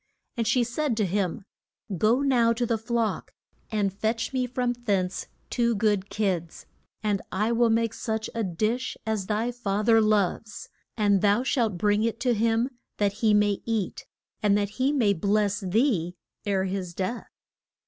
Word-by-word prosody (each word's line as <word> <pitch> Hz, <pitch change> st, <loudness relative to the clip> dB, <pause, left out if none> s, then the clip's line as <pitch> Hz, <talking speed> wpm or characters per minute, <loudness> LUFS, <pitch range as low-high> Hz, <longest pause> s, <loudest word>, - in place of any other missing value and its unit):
And 230 Hz, -3 st, -1 dB
she 240 Hz, +2 st, +3 dB
said 245 Hz, +1 st, -1 dB
to 215 Hz, -, +2 dB
him, 190 Hz, 0 st, -1 dB, 0.5 s
Go 220 Hz, +8 st, +3 dB
now 245 Hz, -4 st, +3 dB
to 240 Hz, +1 st, -1 dB
the 230 Hz, -1 st, 0 dB
flock, 230 Hz, -1 st, -2 dB, 0.4 s
and 205 Hz, -3 st, 0 dB
fetch 220 Hz, +5 st, -2 dB
me 255 Hz, -1 st, 0 dB
from 245 Hz, 0 st, -1 dB
thence 200 Hz, -6 st, -1 dB, 0.2 s
two 235 Hz, -1 st, +1 dB
good 205 Hz, -2 st, +1 dB
kids, 185 Hz, -6 st, -2 dB, 0.4 s
and 205 Hz, -2 st, 0 dB
I 210 Hz, +4 st, 0 dB
will 235 Hz, 0 st, +3 dB
make 225 Hz, 0 st, +1 dB
such 220 Hz, -2 st, -3 dB
a 230 Hz, -, -1 dB
dish 215 Hz, +7 st, -1 dB
as 215 Hz, -4 st, -2 dB
thy 220 Hz, +4 st, 0 dB
fa 215 Hz, -4 st, -2 dB
ther 225 Hz, -1 st, +6 dB
loves. 215 Hz, 0 st, 0 dB, 0.3 s
And 205 Hz, -3 st, +3 dB
thou 210 Hz, +4 st, +3 dB
shalt 230 Hz, -8 st, 0 dB
bring 205 Hz, +3 st, +2 dB
it 230 Hz, 0 st, -1 dB
to 250 Hz, -2 st, +2 dB
him 230 Hz, +3 st, +1 dB, 0.3 s
that 200 Hz, -1 st, +1 dB
he 215 Hz, -2 st, +4 dB
may 205 Hz, -1 st, +2 dB
eat, 220 Hz, -4 st, -3 dB, 0.3 s
and 205 Hz, -2 st, +3 dB
that 205 Hz, -1 st, 0 dB
he 270 Hz, +2 st, +3 dB
may 235 Hz, -9 st, +3 dB
bless 205 Hz, +2 st, +1 dB
thee 190 Hz, -, +1 dB, 0.3 s
ere 195 Hz, -2 st, +1 dB
his 185 Hz, -2 st, -4 dB
death. 225 Hz, +6 st, -3 dB
215 Hz, 170 wpm, -26 LUFS, 200-235 Hz, 0.5 s, ther